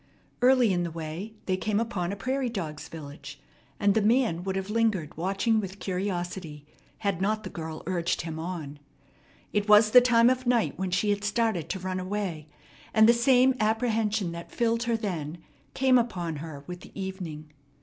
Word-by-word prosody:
Early 250 Hz, -4 st, +5 dB
in 175 Hz, -, +1 dB
the 170 Hz, -, -2 dB
way 165 Hz, +6 st, -6 dB
they 185 Hz, -, +1 dB
came 210 Hz, +1 st, 0 dB
upon 195 Hz, -6 st, -2 dB
a -, -, -3 dB
prairie 255 Hz, +5 st, -1 dB
dogs' 160 Hz, -9 st, -5 dB
village, 145 Hz, -2 st, -9 dB, 0.4 s
and 200 Hz, -1 st, +3 dB
the 220 Hz, -, +2 dB
man 220 Hz, -6 st, +2 dB
would 190 Hz, 0 st, -2 dB
have 190 Hz, +2 st, -3 dB
lingered 215 Hz, -9 st, 0 dB
watching 195 Hz, +6 st, +1 dB
with 195 Hz, -2 st, -5 dB
curiosity, 180 Hz, -5 st, -4 dB, 0.3 s
had 200 Hz, -4 st, -1 dB
not 215 Hz, +2 st, 0 dB
the 185 Hz, -, -7 dB
girl 160 Hz, -1 st, -6 dB
urged 170 Hz, -1 st, -1 dB
him 160 Hz, -1 st, -5 dB
on. 160 Hz, -4 st, -5 dB, 0.7 s
It 210 Hz, 0 st, 0 dB
was 210 Hz, +1 st, +7 dB
the 250 Hz, -, +9 dB
time 240 Hz, 0 st, +5 dB
of 255 Hz, -1 st, -2 dB
night 240 Hz, -2 st, +2 dB
when 190 Hz, 0 st, -2 dB
she 205 Hz, +4 st, +1 dB
had 205 Hz, 0 st, -1 dB
started 210 Hz, -5 st, 0 dB
to 190 Hz, -, -2 dB
run 185 Hz, 0 st, -3 dB
away, 185 Hz, -5 st, -3 dB, 0.5 s
and 220 Hz, 0 st, +7 dB
the 235 Hz, -, +7 dB
same 255 Hz, +2 st, +4 dB
apprehension 220 Hz, -3 st, +1 dB
that 170 Hz, 0 st, -8 dB
filled 230 Hz, -1 st, +1 dB
her 235 Hz, -1 st, +1 dB
then 175 Hz, -7 st, -4 dB, 0.4 s
came 260 Hz, -1 st, +5 dB
upon 175 Hz, -9 st, -2 dB
her 145 Hz, -2 st, -8 dB
with 180 Hz, 0 st, -7 dB
the -, -, -12 dB
evening. 175 Hz, -6 st, -6 dB
195 Hz, 180 wpm, -27 LUFS, 170-225 Hz, 0.7 s, the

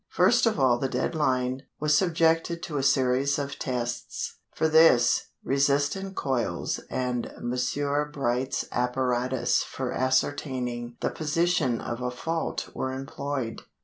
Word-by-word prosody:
First 230 Hz, +7 st, +4 dB
of 220 Hz, -8 st, +1 dB
all 125 Hz, -3 st, +4 dB
the 135 Hz, -, -1 dB
dead 130 Hz, +6 st, -1 dB
line 130 Hz, -4 st, 0 dB, 0.2 s
was 150 Hz, 0 st, +3 dB
subjected 165 Hz, 0 st, +2 dB
to 150 Hz, -4 st, -3 dB
a -, -, +1 dB
series 135 Hz, +1 st, +2 dB
of 140 Hz, -1 st, -4 dB
tests. 125 Hz, -2 st, -3 dB, 0.2 s
For 160 Hz, -, +2 dB
this, 155 Hz, -6 st, +5 dB, 0.2 s
resistance 145 Hz, +8 st, +1 dB
coils 130 Hz, -4 st, -1 dB
and 125 Hz, -2 st, -2 dB
Messrs. 140 Hz, +4 st, -1 dB
Bright's 130 Hz, -2 st, -1 dB
apparatus 125 Hz, 0 st, +1 dB
for 130 Hz, -2 st, -4 dB
ascertaining 130 Hz, -2 st, -1 dB
the -, -, 0 dB
position 160 Hz, -5 st, +1 dB
of 120 Hz, +1 st, -5 dB
a 125 Hz, -, -1 dB
fault 160 Hz, +6 st, -3 dB
were 130 Hz, -, -2 dB
employed. 135 Hz, -2 st, -4 dB
135 Hz, 130 wpm, -27 LUFS, 125-150 Hz, 0.2 s, this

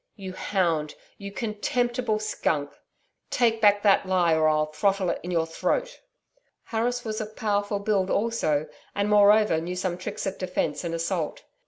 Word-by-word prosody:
'You 190 Hz, -3 st, -7 dB
hound! 170 Hz, -6 st, -1 dB, 0.2 s
You 200 Hz, 0 st, -7 dB
contemptible 235 Hz, +2 st, -1 dB
skunk! 155 Hz, -8 st, -1 dB, 0.6 s
Take 230 Hz, -2 st, +2 dB
back 205 Hz, -1 st, +5 dB
that 200 Hz, -2 st, +5 dB
lie, 180 Hz, -3 st, +3 dB
or 160 Hz, 0 st, +3 dB
I'll 155 Hz, 0 st, +3 dB
throttle 190 Hz, +4 st, 0 dB
it -, -, -4 dB
in 175 Hz, -, -7 dB
your 165 Hz, -2 st, +1 dB
throat.' -, -, -2 dB, 0.6 s
Harris 240 Hz, +2 st, -1 dB
was 215 Hz, 0 st, -3 dB
of 215 Hz, 0 st, -7 dB
powerful 205 Hz, -1 st, 0 dB
build 200 Hz, -2 st, 0 dB
also, 200 Hz, -9 st, +1 dB, 0.3 s
and, 200 Hz, +1 st, 0 dB
moreover 210 Hz, -4 st, +5 dB
knew 180 Hz, +2 st, -4 dB
some 180 Hz, -1 st, -2 dB
tricks 185 Hz, -, -5 dB
of 195 Hz, 0 st, -4 dB
defence 180 Hz, -5 st, -2 dB
and 165 Hz, 0 st, -2 dB
assault. 165 Hz, -1 st, -2 dB
200 Hz, 160 wpm, -26 LUFS, 170-215 Hz, 0.6 s, back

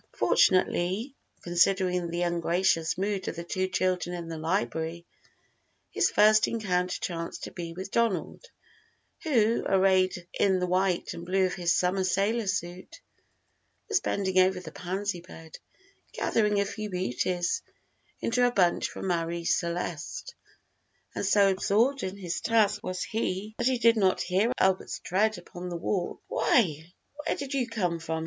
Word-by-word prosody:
Fortunately, 185 Hz, +6 st, +2 dB, 0.3 s
considering 180 Hz, 0 st, +2 dB
the 170 Hz, +1 st, -1 dB
ungracious 170 Hz, -1 st, +1 dB
mood 195 Hz, 0 st, -2 dB
of -, -, -3 dB
the 170 Hz, -, -5 dB
two 185 Hz, +2 st, -1 dB
children 180 Hz, -1 st, -1 dB
in 170 Hz, -1 st, -6 dB
the 165 Hz, -, -5 dB
library, 165 Hz, -1 st, -2 dB, 0.9 s
his -, -, +2 dB
first 215 Hz, +1 st, +5 dB
encounter 180 Hz, -5 st, -1 dB
chanced 165 Hz, -1 st, -5 dB
to -, -, -6 dB
be 170 Hz, -2 st, -6 dB
with 190 Hz, +3 st, -7 dB
Donald, 230 Hz, -, 0 dB, 0.8 s
who, 235 Hz, -, +2 dB
arrayed 185 Hz, -2 st, +2 dB
in 190 Hz, -2 st, +2 dB
the 180 Hz, -, 0 dB
white 185 Hz, 0 st, 0 dB
and 170 Hz, -, -8 dB
blue 190 Hz, +2 st, +2 dB
of 185 Hz, -, -1 dB
his 175 Hz, -2 st, +1 dB
summer 185 Hz, +1 st, +1 dB
sailor 200 Hz, +4 st, 0 dB
suit, 185 Hz, -, -4 dB, 0.9 s
was 420 Hz, -3 st, +3 dB
bending 190 Hz, -, 0 dB
over 185 Hz, 0 st, +3 dB
the 180 Hz, -3 st, -9 dB
pansy 190 Hz, 0 st, -3 dB
bed, 165 Hz, -2 st, -12 dB, 0.5 s
gathering 210 Hz, -2 st, +1 dB
a 200 Hz, -, +2 dB
few 210 Hz, +1 st, -5 dB
"beauties" 180 Hz, 0 st, -1 dB, 0.6 s
into 245 Hz, +2 st, +1 dB
a 245 Hz, -, +5 dB
bunch 185 Hz, -7 st, +2 dB
for -, -, -8 dB
Marie 170 Hz, -2 st, -1 dB
Celeste; 170 Hz, -, -2 dB, 0.8 s
and -, -, -3 dB
so 200 Hz, -2 st, +5 dB
absorbed 225 Hz, +8 st, +1 dB
in 190 Hz, +1 st, -4 dB
his 180 Hz, -4 st, -4 dB
task 210 Hz, -2 st, +2 dB
was 185 Hz, -2 st, -3 dB
he 215 Hz, -1 st, -3 dB
that -, -, +2 dB
he 260 Hz, -1 st, +2 dB
did 230 Hz, 0 st, +4 dB
not 190 Hz, -3 st, +3 dB
hear 195 Hz, +6 st, +1 dB
Albert's 190 Hz, 0 st, +1 dB
tread 215 Hz, +4 st, 0 dB
upon 175 Hz, 0 st, -8 dB
the 175 Hz, -, -4 dB
walk. 175 Hz, +1 st, -2 dB
"Why, 165 Hz, -, +1 dB, 0.3 s
where 310 Hz, -, 0 dB
did 280 Hz, 0 st, -5 dB
you 260 Hz, -3 st, 0 dB
come 180 Hz, -7 st, -1 dB
from?" 160 Hz, 0 st, -3 dB
185 Hz, 155 wpm, -28 LUFS, 175-210 Hz, 0.9 s, first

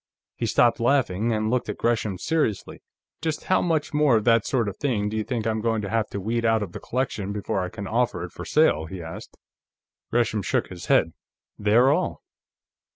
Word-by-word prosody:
He -, -, -2 dB
stopped 120 Hz, 0 st, +3 dB
laughing, 120 Hz, -4 st, +1 dB
and 110 Hz, 0 st, 0 dB
looked 125 Hz, 0 st, 0 dB
at -, -, -3 dB
Gresham 110 Hz, -5 st, 0 dB
seriously. 115 Hz, -, -1 dB, 0.4 s
"Just 160 Hz, -1 st, -2 dB
how 185 Hz, -, +2 dB
much 160 Hz, -4 st, 0 dB
more 150 Hz, -4 st, +4 dB
of 110 Hz, -, -1 dB
that 115 Hz, -1 st, +3 dB
sort 120 Hz, -5 st, +1 dB
of 100 Hz, 0 st, -5 dB
thing 110 Hz, -8 st, 0 dB
do 110 Hz, -, -5 dB
you 110 Hz, -, 0 dB
think 115 Hz, -1 st, -3 dB
I'm 110 Hz, -1 st, 0 dB
going 110 Hz, -1 st, 0 dB
to 100 Hz, -, -4 dB
have 115 Hz, -1 st, 0 dB
to 100 Hz, -, -4 dB
weed 115 Hz, +4 st, -1 dB
out 115 Hz, -2 st, +2 dB
of 95 Hz, -, -7 dB
the -, -, -7 dB
collection, 110 Hz, -6 st, -2 dB
before 100 Hz, -2 st, -2 dB
I 90 Hz, -, -3 dB
can 100 Hz, -, -7 dB
offer 120 Hz, +4 st, 0 dB
it -, -, -7 dB
for -, -, -8 dB
sale?" 80 Hz, +1 st, +2 dB
he 95 Hz, +3 st, -7 dB
asked. 80 Hz, -, -9 dB, 0.7 s
Gresham 115 Hz, -3 st, +1 dB
shook -, -, -1 dB
his 90 Hz, -3 st, -9 dB
head. 80 Hz, 0 st, +3 dB, 0.5 s
"They're 115 Hz, +6 st, +4 dB
all. -, -, -1 dB
110 Hz, 210 wpm, -25 LUFS, 100-120 Hz, 0.7 s, more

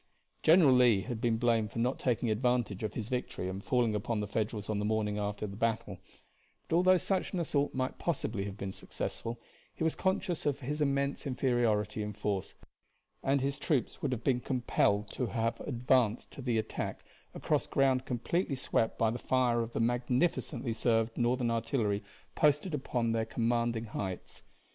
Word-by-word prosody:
General 160 Hz, -4 st, +6 dB
Lee 120 Hz, -5 st, +5 dB
has 120 Hz, +2 st, -4 dB
been 115 Hz, -1 st, +1 dB
blamed 115 Hz, -3 st, +2 dB
for -, -, -8 dB
not 125 Hz, +3 st, 0 dB
taking 120 Hz, -2 st, +1 dB
advantage 120 Hz, -3 st, 0 dB
of 110 Hz, -2 st, -3 dB
his 110 Hz, -3 st, -3 dB
victory 125 Hz, -7 st, -3 dB
and 95 Hz, +1 st, -5 dB
falling 120 Hz, -4 st, +2 dB
upon 105 Hz, +2 st, -1 dB
the 105 Hz, -, -1 dB
Federals 105 Hz, 0 st, -2 dB
on 105 Hz, -1 st, -1 dB
the -, -, -1 dB
morning 105 Hz, -1 st, 0 dB
after 105 Hz, +1 st, -2 dB
the 100 Hz, -1 st, -6 dB
battle; 110 Hz, -3 st, -1 dB, 0.7 s
but -, -, +1 dB
although 185 Hz, +2 st, +5 dB
such 190 Hz, +2 st, -1 dB
an 185 Hz, -, 0 dB
assault 145 Hz, -3 st, 0 dB
might 130 Hz, 0 st, -2 dB
possibly 115 Hz, -, -1 dB
have 100 Hz, 0 st, -6 dB
been 95 Hz, -1 st, -4 dB
successful 115 Hz, +4 st, -5 dB, 0.4 s
he -, -, -3 dB
was 160 Hz, -, +1 dB
conscious 190 Hz, -4 st, -1 dB
of 145 Hz, 0 st, 0 dB
his 145 Hz, +4 st, -3 dB
immense 140 Hz, 0 st, 0 dB
inferiority 120 Hz, -5 st, +1 dB
in 105 Hz, 0 st, -3 dB
force, 100 Hz, -2 st, -3 dB, 0.7 s
and 135 Hz, 0 st, +2 dB
his 140 Hz, +1 st, -1 dB
troops 140 Hz, -7 st, -1 dB
would 140 Hz, -, -1 dB
have 120 Hz, -2 st, -3 dB
been 125 Hz, -2 st, +2 dB
compelled 115 Hz, -5 st, +1 dB
to 125 Hz, -, -2 dB
have 115 Hz, +2 st, -1 dB
advanced 125 Hz, -3 st, +1 dB
to -, -, -9 dB
the 120 Hz, -3 st, 0 dB
attack 110 Hz, 0 st, -3 dB, 0.3 s
across -, -, 0 dB
ground 135 Hz, -2 st, +2 dB
completely 135 Hz, +5 st, -1 dB
swept 115 Hz, -3 st, 0 dB
by 115 Hz, -1 st, +2 dB
the 120 Hz, -, -4 dB
fire 125 Hz, -2 st, +2 dB
of 115 Hz, 0 st, -5 dB
the -, -, -1 dB
magnificently 120 Hz, +1 st, 0 dB
served 115 Hz, 0 st, +1 dB
Northern 120 Hz, 0 st, +1 dB
artillery 115 Hz, -3 st, 0 dB, 0.3 s
posted 150 Hz, +3 st, +2 dB
upon 120 Hz, -5 st, -1 dB
their 115 Hz, 0 st, 0 dB
commanding 115 Hz, 0 st, 0 dB
heights. 95 Hz, -4 st, -5 dB
120 Hz, 175 wpm, -31 LUFS, 110-130 Hz, 0.7 s, General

